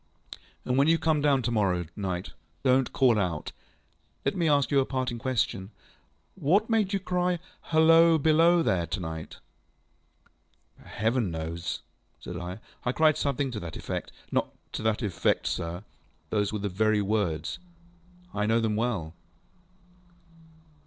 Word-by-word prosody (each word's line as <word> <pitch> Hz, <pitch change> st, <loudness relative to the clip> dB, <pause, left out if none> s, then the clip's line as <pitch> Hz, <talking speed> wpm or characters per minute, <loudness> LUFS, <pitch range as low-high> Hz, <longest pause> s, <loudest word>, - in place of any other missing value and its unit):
ŌĆØ -, -, -2 dB
ŌĆ£And -, -, +1 dB
when 140 Hz, +2 st, +4 dB
you 165 Hz, +1 st, +5 dB
come 160 Hz, -2 st, +1 dB
down 140 Hz, -3 st, +3 dB
to 120 Hz, -, -1 dB
morrow 95 Hz, -6 st, +1 dB
night, 95 Hz, -2 st, -3 dB, 0.3 s
donŌĆÖt 130 Hz, 0 st, +3 dB
call 125 Hz, -5 st, +3 dB
out! 85 Hz, -6 st, -2 dB, 0.7 s
Let 135 Hz, -, +1 dB
me 170 Hz, -3 st, +1 dB
ask 140 Hz, -4 st, +2 dB
you 140 Hz, -, +4 dB
a 135 Hz, -, +2 dB
parting 130 Hz, -3 st, -2 dB
question. 115 Hz, -6 st, -1 dB, 0.6 s
What 195 Hz, +7 st, +1 dB
made 215 Hz, -4 st, +2 dB
you 200 Hz, -, +1 dB
cry, 180 Hz, -1 st, 0 dB, 0.3 s
ŌĆśHalloa! 165 Hz, -1 st, +5 dB
Below 165 Hz, +2 st, +5 dB
there! 85 Hz, -, +1 dB
ŌĆÖ -, -, -24 dB
to -, -, -2 dB
night? 80 Hz, -2 st, -6 dB
ŌĆØ -, -, -31 dB
ŌĆ£Heaven 110 Hz, -1 st, 0 dB
knows, 80 Hz, +1 st, -4 dB, 0.4 s
ŌĆØ -, -, -25 dB
said 90 Hz, -, -6 dB
I. 90 Hz, +1 st, -5 dB, 0.3 s
ŌĆ£I 125 Hz, +1 st, -1 dB
cried 155 Hz, -1 st, +4 dB
something 140 Hz, -1 st, -1 dB
to 110 Hz, -, -4 dB
that 85 Hz, -3 st, -7 dB
effectŌĆöŌĆØ -, -, -4 dB, 0.3 s
ŌĆ£Not -, -, +2 dB, 0.2 s
to -, -, -4 dB
that 110 Hz, +1 st, 0 dB
effect, 100 Hz, -5 st, 0 dB
sir. 85 Hz, +3 st, -3 dB, 0.5 s
Those 105 Hz, -2 st, +1 dB
were 110 Hz, -, -2 dB
the 105 Hz, 0 st, -2 dB
very 105 Hz, +2 st, +1 dB
words. 95 Hz, -7 st, -1 dB, 0.7 s
I 105 Hz, 0 st, 0 dB
know 115 Hz, +1 st, +3 dB
them 110 Hz, -2 st, 0 dB
well. 105 Hz, -9 st, -1 dB
115 Hz, 160 wpm, -28 LUFS, 95-150 Hz, 0.7 s, you